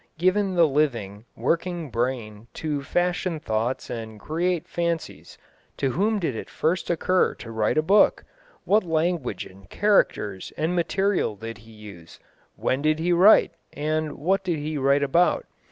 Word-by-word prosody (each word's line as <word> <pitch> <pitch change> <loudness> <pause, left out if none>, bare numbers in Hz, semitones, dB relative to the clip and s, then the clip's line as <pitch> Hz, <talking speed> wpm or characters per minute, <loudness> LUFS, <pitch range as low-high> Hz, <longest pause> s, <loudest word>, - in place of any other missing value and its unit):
Given 185 +2 +1
the 170 -1 +6
living, 120 -8 -1
working 170 -3 -2
brain 115 -3 -3
to 150 -3 -2
fashion 175 +2 -1
thoughts 115 0 -2
and 110 -2 -6
create 170 - -1
fancies, 170 -1 -4 0.4
to 135 -2 0
whom 210 - +1
did 165 - -2
it - - -6
first 170 +3 -1
occur 180 +2 +1
to 115 - -10
write 110 +3 0
a 155 - +3
book, 200 +6 +4 0.4
what 215 +2 +3
language 160 - -1
and 95 -1 -16
characters 105 - +1
and 160 +3 0
material 185 - 0
did 115 +1 -8
he 110 +2 -16
use, 100 -6 -13 0.4
when 130 - -1
did 155 +1 +2
he 175 +2 +1
write, 185 +5 +6 0.2
and 155 0 -2
what 190 +7 0
did 175 -3 -1
he 150 +1 -4
write 140 0 +2
about? 170 +6 +2
155 Hz, 155 wpm, -24 LUFS, 115-175 Hz, 0.4 s, the